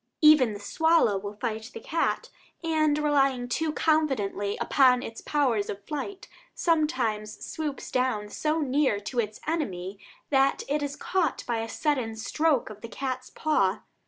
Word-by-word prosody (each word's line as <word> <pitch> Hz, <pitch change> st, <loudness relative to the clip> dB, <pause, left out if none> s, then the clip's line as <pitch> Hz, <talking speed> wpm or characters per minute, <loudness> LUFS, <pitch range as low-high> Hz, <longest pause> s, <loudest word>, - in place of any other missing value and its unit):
Even 300 Hz, -7 st, +7 dB
the 205 Hz, -, -7 dB
swallow 320 Hz, 0 st, +3 dB
will 205 Hz, +1 st, -5 dB
fight 220 Hz, +2 st, -4 dB
the -, -, -5 dB
cat, 330 Hz, -, -1 dB, 0.3 s
and, 310 Hz, -2 st, +2 dB
relying 275 Hz, -4 st, +2 dB
too 315 Hz, +5 st, 0 dB
confidently 265 Hz, -12 st, 0 dB
upon 255 Hz, -2 st, +4 dB
its 225 Hz, -, -7 dB
powers 250 Hz, -9 st, +1 dB
of 200 Hz, 0 st, -6 dB
flight, 370 Hz, +7 st, -5 dB, 0.3 s
sometimes 255 Hz, -11 st, 0 dB
swoops 300 Hz, -3 st, -5 dB
down 250 Hz, -5 st, 0 dB
so 305 Hz, +9 st, -1 dB
near 270 Hz, -6 st, +2 dB
to 240 Hz, +5 st, -4 dB
its 215 Hz, -2 st, -2 dB
enemy 195 Hz, -, -3 dB, 0.3 s
that 270 Hz, 0 st, +3 dB
it 295 Hz, +1 st, 0 dB
is 285 Hz, 0 st, -3 dB
caught 350 Hz, -4 st, -1 dB
by 235 Hz, -2 st, -1 dB
a 225 Hz, 0 st, -4 dB
sudden 255 Hz, -7 st, -1 dB
stroke 285 Hz, +3 st, 0 dB
of 210 Hz, 0 st, -12 dB
the 230 Hz, -, -7 dB
cat's 255 Hz, -1 st, -4 dB
paw. 210 Hz, -11 st, +1 dB
260 Hz, 155 wpm, -27 LUFS, 215-305 Hz, 0.3 s, Even